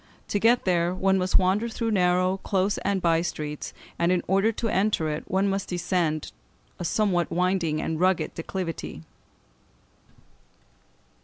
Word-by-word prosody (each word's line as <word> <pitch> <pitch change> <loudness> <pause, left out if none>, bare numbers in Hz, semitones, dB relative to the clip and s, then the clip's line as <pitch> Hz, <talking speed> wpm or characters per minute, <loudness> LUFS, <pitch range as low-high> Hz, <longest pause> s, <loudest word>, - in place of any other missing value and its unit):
To 205 - 0
get 235 +3 +3
there 175 -1 +1
one 190 +1 +2
must 185 0 +3
wander 195 +5 +1
through 225 0 -2
narrow, 185 -1 +2
close, 195 +1 0
and 195 -2 -1
by 165 -1 +3
streets; 150 -3 -4 0.3
and 170 +1 +3
in 180 - +1
order 195 +4 +2
to 230 +1 -3
enter 190 -5 +1
it, 150 +1 -4
one 190 +2 +2
must 195 0 -2
descend 175 -3 -1 0.5
a - - -4
somewhat 180 -1 +1
winding 175 -3 +1
and 160 0 -2
rugged 180 -3 +1
declivity. 165 - -5
185 Hz, 145 wpm, -26 LUFS, 170-195 Hz, 0.5 s, get